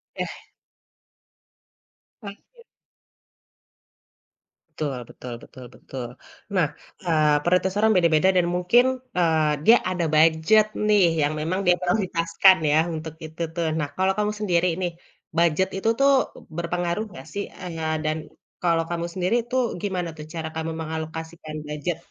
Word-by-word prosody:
Eh. - - -5 1.8
Oke. 460 - -12 2.1
Betul 140 -5 -3
betul 125 -1 -8
betul 130 -1 -12
betul. 125 -3 -7 0.5
Nah, 165 -5 +3 0.4
eee, 155 -3 +3
prioritas 180 +2 +1
orang 220 0 +4
beda-beda 170 +1 +4
dan 175 -1 +3
mungkin, 205 +8 +4 0.3
eee, 160 -3 +3
dia 235 +2 +8
ada 180 -2 -1
budget 160 +7 +5 0.2
nih 205 -3 +5 0.2
yang 145 +1 +1
memang 180 +5 -1
dia 180 0 +5
prioritaskan 180 -1 +3 0.2
ya, 155 - +5 0.2
untuk 160 0 -6
itu 160 +2 -9
tuh. 170 -1 -1
Nah, 145 - -1
kalau 190 +1 +2
kamu 210 0 +1
sendiri 180 -3 +2
nih, 175 -1 -1 0.5
budget 170 +3 +3
itu 220 - 0
tuh 275 0 +5 0.5
berpengaruh 175 +3 -1
nggak 135 -5 -10
sih, 200 0 -2 0.2
eee, 165 -3 -4 0.2
dan 155 +1 0 0.5
kalau 165 -1 +3
kamu 170 0 -2
sendiri 185 +4 0 0.2
tuh 260 0 +2 0.2
gimana 180 -4 -2
tuh 150 - -8
cara 160 -1 -4
kamu 160 0 -3
mengalokasikan 160 0 -6
budget? 150 +3 -3
170 Hz, 135 wpm, -24 LUFS, 160-190 Hz, 2.1 s, dia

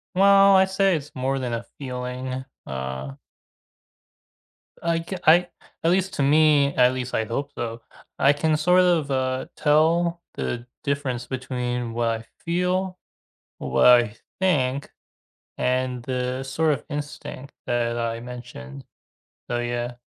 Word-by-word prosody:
Well, 195 0 +6
I 190 0 +6
say 190 -1 +2
it's 150 -1 -5
more 135 +1 -1
than 125 -2 -3
a 115 0 -3
feeling, 130 0 -5 0.2
uh 65 0 -5 1.7
I 165 0 +1
c 190 - -5
I 175 +3 +6 0.3
at 165 - +3
least 190 +1 +1
to 140 - +1
me 145 -1 +4
at 125 0 +5
least 125 -1 -4
I 110 - +1
hope 140 +6 -3
so, 115 0 -4 0.4
I 140 +1 +5
can 155 +1 +1
sort 180 +4 +4
of, 170 -5 +2
uh, 130 0 0
tell 165 +3 +2
the 120 0 -4 0.2
difference 135 -4 -2
between 125 -2 -3
what 115 0 0
I - - -18 0.2
feel, 180 +2 0 0.6
what - - +2
I 120 -3 +6 0.2
think, 140 -7 +1 0.7
and 125 -1 0
the 125 0 -2
sort 150 +4 +1
of - - -3
instinct 145 -2 -6
that 120 -1 0
I 115 0 -2
mentioned. 120 - -9 0.7
So, 120 - 0
yeah. 120 0 -3
130 Hz, 135 wpm, -24 LUFS, 120-160 Hz, 1.7 s, Well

